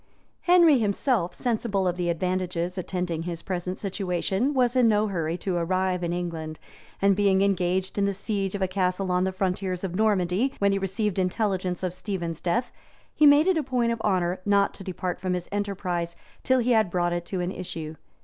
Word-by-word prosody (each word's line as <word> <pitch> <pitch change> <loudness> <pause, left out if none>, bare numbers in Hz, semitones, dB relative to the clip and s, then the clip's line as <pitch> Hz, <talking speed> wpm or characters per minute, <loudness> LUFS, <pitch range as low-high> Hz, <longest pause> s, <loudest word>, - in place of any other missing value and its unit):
Henry 345 -6 +6
himself, 210 -2 0
sensible 220 -5 0
of 175 - 0
the 175 -1 -1
advantages 180 0 -1
attending 180 -3 -3
his 170 0 -5
present 180 0 -3
situation, 195 +4 -1
was 255 -3 +2
in 250 -2 +5
no 210 -1 +3
hurry 165 -3 -2
to 185 -1 -2
arrive 185 +1 0
in 170 - -1
England; 165 -3 -4 0.4
and 200 -1 +5
being 195 -1 +3
engaged 190 0 0
in 200 - +3
the 200 - +1
siege 195 -1 -2
of 195 - -1
a - - +2
castle 185 0 -1
on 180 +1 +2
the 190 - 0
frontiers 185 -1 -2
of 185 -3 -3
Normandy, 205 +4 +1
when 200 0 +2
he 195 - +1
received 195 +1 -1
intelligence 185 -1 -1
of 180 -2 -1
Stephen's 175 -4 -4
death, 235 +8 0 0.4
he 300 - +5
made 290 +2 +7
it 375 -2 +3
a - - -1
point 250 -3 0
of 230 -1 -3
honor 185 -3 0
not 200 0 +2
to - - -9
depart 180 -1 -4
from 185 -1 -1
his 180 -1 -5
enterprise 185 -4 -2 0.3
till 260 - +2
he 250 0 +1
had 220 -5 +4
brought 175 0 0
it 175 0 -2
to 190 - -3
an 180 +1 -1
issue. 160 -4 -6
190 Hz, 195 wpm, -26 LUFS, 180-205 Hz, 0.4 s, made